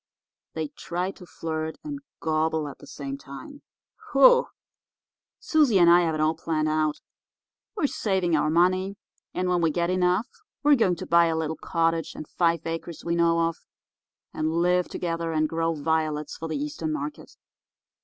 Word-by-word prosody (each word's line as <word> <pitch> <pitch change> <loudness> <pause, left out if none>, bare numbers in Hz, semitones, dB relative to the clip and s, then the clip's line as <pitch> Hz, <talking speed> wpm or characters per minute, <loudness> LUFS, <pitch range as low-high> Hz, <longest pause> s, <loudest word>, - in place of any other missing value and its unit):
They 160 -2 -2
try 175 +5 -4
to 180 -2 -14
flirt 160 -1 -4
and 295 -2 -5 0.2
gobble 160 -1 0
at 140 - -9
the - - -14
same 140 -1 -6
time. 140 - -10 0.5
Whew! - - +6 0.9
Susie 300 - +3
and 170 -2 +6
I 175 +1 +7
have 165 -2 0
it - - -3
all 155 +1 +3
planned 155 -1 -1
out. 155 -1 0 0.8
We're 350 - 0
saving 190 - 0
our 150 0 +2
money, 185 +4 +2 0.4
and 185 - 0
when 180 -1 +1
we 165 - +3
get 170 +3 0
enough 185 +3 +2 0.4
we're 295 0 +6
going 225 -9 +3
to - - -7
buy 170 0 +5
a 165 - 0
little 160 0 -2
cottage 165 +1 -1
and 155 - -7
five 170 -2 +1
acres 165 0 -5
we 170 - 0
know 170 0 +3
of, 165 0 0 0.8
and 155 +1 -1
live 180 +1 +2
together, 165 -1 -3
and 155 0 +2
grow 165 +1 -1
violets 155 -1 -1
for 165 - -6
the 160 - -2
Eastern 300 +2 -3
market. 300 0 -6
165 Hz, 170 wpm, -26 LUFS, 160-180 Hz, 0.9 s, I